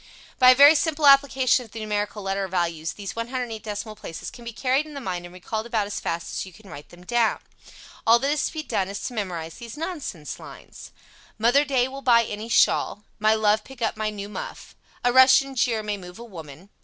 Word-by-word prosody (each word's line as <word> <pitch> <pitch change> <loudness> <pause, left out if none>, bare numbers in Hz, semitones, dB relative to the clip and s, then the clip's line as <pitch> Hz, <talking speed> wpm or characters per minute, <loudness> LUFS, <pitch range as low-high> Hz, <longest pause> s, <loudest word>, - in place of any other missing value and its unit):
By 255 -1 +8
a 255 - +8
very 285 +3 +9
simple 315 -1 0
application 270 -2 +5
of 225 - -17
the 225 - -6
numerical 210 -1 -3
letter 195 0 -2
values 170 -3 -2
these 200 -2 -7
108 230 -1 -4
decimal 215 0 -6
places 165 -5 -8
can 240 - -13
be 235 - -6
carried 265 +5 0
in 300 - -11
the - - -4
mind 180 -7 -4
and 175 - -16
recalled 220 +5 -4
about 220 -3 0
as 205 - -4
fast 170 0 -4
as - - -2
you 190 - -10
can 200 +1 -16
write 145 - -10
them 175 +1 -16
down. 235 +1 +2 0.7
All 230 +1 +7
that 275 +4 0
is 300 -2 0
to - - -8
be 310 -1 -4
done 190 -9 -1
is 200 - -5
to - - -4
memorize 175 -7 -5
these 235 +2 -9
nonsense 300 - -5
lines: - - -12 0.5
Mother 240 +6 +4
Day 265 -3 +1
will 270 +1 -8
buy 235 -3 +5
any 215 +1 -6
shawl. 210 -2 +2 0.2
My 215 +1 +4
love 215 0 +2
pick 265 -2 -13
up 220 - 0
my 215 0 -2
new 205 -1 -6
muff. 210 - -8 0.3
A 245 0 +2
Russian 260 +1 +6
jeer 240 -4 0
may 210 -1 -3
move 180 -1 -11
a 235 - -9
woman. 170 -4 -11
220 Hz, 225 wpm, -24 LUFS, 200-255 Hz, 0.7 s, very